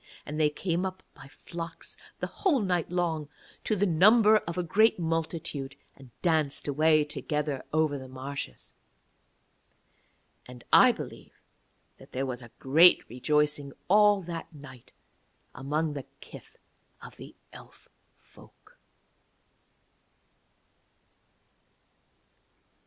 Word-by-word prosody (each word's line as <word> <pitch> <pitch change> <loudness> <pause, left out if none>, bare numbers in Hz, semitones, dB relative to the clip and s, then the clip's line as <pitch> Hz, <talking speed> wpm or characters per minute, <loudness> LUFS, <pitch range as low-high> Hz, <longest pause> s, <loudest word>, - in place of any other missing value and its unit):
And 150 +1 -5
they 150 -1 +4
came 170 +3 -2
up 190 0 -5
by 135 -3 -14
flocks 165 +3 -8 0.3
the - - 0
whole 345 -9 0
night 180 -6 -1
long 165 -4 -2 0.3
to 215 - 0
the 205 0 +1
number 210 +5 +5
of 170 -4 -5
a 180 - 0
great 215 +6 +3
multitude, 160 -4 -3 0.2
and 135 -2 -16
danced 155 -5 0
away 155 +2 +3
together 150 -2 -3
over 155 -2 +1
the 130 - -10
marshes. 130 - -8 1.7
And 125 -1 -12
I - - +8
believe - - -10 0.6
that - - -17
there 135 +1 -2
was 130 -1 -4
a 120 - -12
great 160 +7 +5
rejoicing 145 +2 0 0.2
all 205 0 +5
that 170 -1 -7
night 140 -5 -14 0.6
among 150 +3 -2
the 140 -3 -7
kith - - -13 0.5
of - - -12
the - - -12 0.2
Elf - - -15 0.3
folk. - - -21
155 Hz, 115 wpm, -28 LUFS, 140-175 Hz, 1.7 s, I